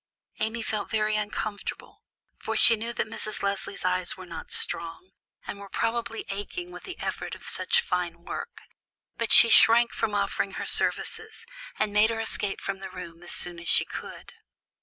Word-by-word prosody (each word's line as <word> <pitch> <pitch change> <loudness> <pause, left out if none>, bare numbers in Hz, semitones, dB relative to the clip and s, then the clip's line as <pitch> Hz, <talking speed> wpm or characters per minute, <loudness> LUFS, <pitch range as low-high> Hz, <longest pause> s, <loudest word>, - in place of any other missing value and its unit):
Amy 220 +1 -2
felt 215 -2 -2
very 215 -1 +1
uncomfortable, 210 0 -4 0.4
for - - -3
she 230 - +9
knew 230 +2 -4
that - - -1
Mrs. 215 -2 -5
Leslie's 200 -1 -3
eyes 185 0 0
were 185 - -9
not 165 -2 -8
strong, 170 +2 -2 0.3
and 200 - -6
were 200 -1 -10
probably 230 +1 -2
aching 280 - -5
with - - -10
the 370 - -7
effort - - -4
of - - -14
such 475 - +2
fine 175 - -3
work; - - -6 0.5
but 230 -1 -2
she 235 - +9
shrank 235 +1 +7
from 220 -2 -1
offering - - -1
her - - -4
services, 445 0 -1 0.3
and 210 -1 0
made 210 +2 +5
her 225 -1 -2
escape 210 -2 -1
from 195 -1 -4
the 190 0 -7
room 175 -2 -9
as 175 - -9
soon 175 -1 +3
as 170 - -8
she - - +5
could. - - -9
210 Hz, 180 wpm, -27 LUFS, 185-230 Hz, 0.5 s, she